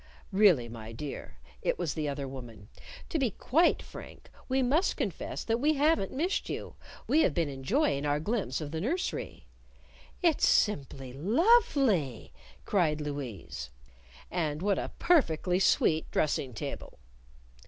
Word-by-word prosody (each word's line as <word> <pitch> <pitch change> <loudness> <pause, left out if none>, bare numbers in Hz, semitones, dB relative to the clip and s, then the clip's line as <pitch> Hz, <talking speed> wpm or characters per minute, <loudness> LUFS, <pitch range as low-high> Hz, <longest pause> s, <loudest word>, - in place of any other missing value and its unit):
"Really, 190 - +5
my 115 -1 -8
dear," 135 +5 -7 0.2
it - - 0
was 165 -5 -2
the 150 -2 -2
other 140 -1 -4
woman 120 -6 -10 0.4
"to 320 - -1
be 260 -4 +2
quite 320 - +2
frank, - - -12 0.2
we 260 0 +2
must 295 +9 +2
confess - - -3
that 230 0 0
we 305 +4 +2
haven't 290 -8 +2
missed 340 +9 -1
you! - - -5 0.3
We've 310 - +3
been 160 0 0
enjoying 140 - 0
our 145 0 +1
glimpse 190 - -2
of 145 -1 -5
the 160 0 -3
nursery." 330 - -3 0.8
"It's 335 -3 +4
simply 135 - +1
lovely!" 230 - +2 0.3
cried 160 -7 +1
Louise. 130 - -5 0.6
"And 160 -2 -2
what 200 -1 +2
a - - -4
perfectly 180 - +2
sweet 160 -3 +2
dressing 135 -5 0
table!" - - -6
165 Hz, 135 wpm, -30 LUFS, -, 0.8 s, Really